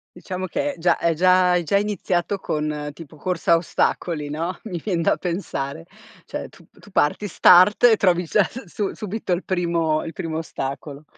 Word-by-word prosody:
Diciamo 185 +1 -5
che 285 +8 -2
già 170 0 +3
è 170 - +1
già 185 +2 +4
è 175 - +2
già 200 +5 +2
iniziato 200 -2 -1
con 150 -3 -3
tipo 155 0 -12
corsa 180 +2 -1
a - - +8
ostacoli, 165 -2 -1
no, 165 +5 -3
mi 185 -6 -5
vien 180 -5 -1
da - - +3
pensare. 140 - -4 0.4
Cioè - - -6
tu - - -19
tu - - -18
parti, 150 +8 +1
start, 185 +3 +6
e 230 -3 +7
trovi 180 -2 +2
già 195 +5 +3
su 245 +8 -7
su 200 +3 -3
subito 210 -1 -5
il 175 - -2
primo 170 -4 0
il 165 - -7
primo 160 -1 -4
ostacolo. 140 -1 -6
175 Hz, 185 wpm, -22 LUFS, 160-190 Hz, 0.4 s, a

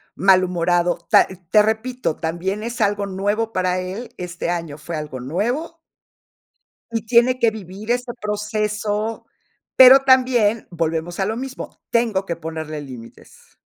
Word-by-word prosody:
malhumorado. 180 -2 +2
Ta - - +6 0.2
te 210 - +6
repito, 220 -2 -1
también 180 +5 -3
es 235 +1 -5
algo 205 -1 +1
nuevo 205 +4 -2
para 185 0 0
él, 190 +7 -6
este 175 -1 -5
año 165 -4 -3
fue 165 +2 -6
algo 150 -4 -6
nuevo 240 - -3 1.1
y 225 -1 -3
tiene 245 +2 +3
que 230 -2 +3
vivir 210 +1 -7
ese 245 0 -1
proceso, 210 +1 -2 0.5
pero, 260 +1 +9
también 250 -5 +3
volvemos 165 +1 -2
a 190 - +1
lo 220 +3 -2
mismo, 265 +1 -7
tengo 225 -5 +1
que 170 -3 -3
ponerle 160 -2 -6
límites. 125 -5 -13
205 Hz, 135 wpm, -21 LUFS, 175-230 Hz, 1.1 s, pero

